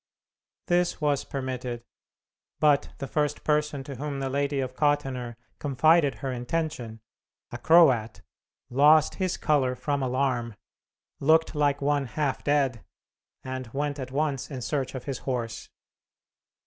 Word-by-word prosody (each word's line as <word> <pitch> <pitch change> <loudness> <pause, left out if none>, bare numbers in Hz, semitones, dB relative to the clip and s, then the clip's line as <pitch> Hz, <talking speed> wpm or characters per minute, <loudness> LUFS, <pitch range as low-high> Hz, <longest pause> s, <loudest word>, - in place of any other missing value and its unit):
This 175 0 +1
was 145 -3 +1
permitted; 125 -3 -5 0.8
but 150 -2 +3
the 140 - -4
first 150 +1 -1
person 150 -2 0
to 135 -1 -8
whom 140 +1 -4
the 135 -1 -2
Lady 140 0 0
of 130 -1 -3
Kottenner 135 -5 0 0.2
confided 145 +1 +3
her 135 - -1
intention, 125 -3 -3 0.5
a - - -6
Croat, 130 -10 +4 0.5
lost 150 +4 +5
his 185 -1 0
color 135 -5 +1
from 140 +2 -2
alarm, 125 -3 -1 0.6
looked 160 +3 +3
like 145 -2 +1
one 145 -1 +1
half 145 +1 -2
dead, 135 -5 +1 0.6
and 130 -1 -5
went 145 +1 -2
at 130 -1 -5
once 140 -1 -1
in 130 -4 -6
search 135 -2 -2
of 130 - -5
his 135 -4 -4
horse. 120 -4 -4
140 Hz, 135 wpm, -27 LUFS, 130-150 Hz, 0.8 s, lost